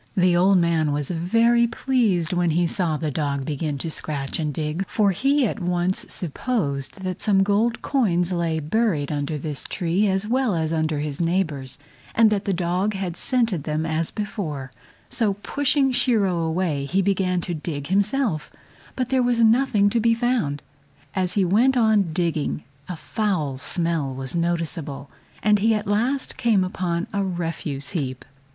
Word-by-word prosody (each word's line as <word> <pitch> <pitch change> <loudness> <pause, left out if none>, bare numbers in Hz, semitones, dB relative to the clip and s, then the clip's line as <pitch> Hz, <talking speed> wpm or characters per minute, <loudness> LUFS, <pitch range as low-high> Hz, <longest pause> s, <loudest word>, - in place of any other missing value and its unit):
The 180 -1 +4
old 190 +2 +4
man 165 -3 +2
was 145 +1 -2
very 230 +8 +3
pleased 225 -8 0
when 175 -1 +1
he 170 +2 +2
saw 170 -2 -1
the 155 -1 -2
dog 140 -2 -2
begin 150 0 -2
to 160 +3 -4
scratch 140 -2 -2
and 155 -2 -1
dig, 155 +5 -2
for 205 -2 +2
he 275 +8 +2
at 225 - -2
once 180 +1 0
supposed 175 - -2
that 185 -1 -4
some 195 -3 +3
gold 215 +4 +1
coins 185 -10 +1
lay 165 -2 0
buried 155 -2 0
under 145 +1 -2
his 145 -2 -3
tree 180 +4 0
as 190 +1 +2
well 250 -3 +1
as 160 -1 -1
under 155 -1 0
his 150 +1 -3
neighbor's, 155 -7 -1 0.4
and 225 -1 +5
that 205 -1 0
the 200 - 0
dog 185 +3 0
had 185 -3 -3
scented 225 - 0
them 155 +1 -1
as 160 0 0
before; 160 - -5 0.4
so 225 -5 0
pushing 275 +5 +1
Shiro 210 -9 +2
away 160 -3 -1
he 190 +7 +1
began 185 -2 +1
to 175 - -4
dig 150 -3 -5
himself, 205 - +1 0.5
but 255 -2 -2
there 265 -1 +2
was 245 -1 +2
nothing 225 -2 +4
to 235 - +2
be 230 +1 +3
found. 230 - -1 0.5
As 185 -2 0
he 195 -1 +2
went 240 +9 +3
on 215 -6 +3
digging 155 -3 -1 0.3
a 180 - -4
foul 160 -11 -2
smell 165 -5 0
was 130 0 -4
noticeable, 165 -4 -2 0.3
and 210 0 +4
he 220 +2 +3
at 210 - -3
last 240 +7 0
came 220 -6 +3
upon 180 -2 -2
a 200 0 0
refuse 165 -6 -3
heap. 135 -8 -4
180 Hz, 170 wpm, -23 LUFS, 155-215 Hz, 0.5 s, and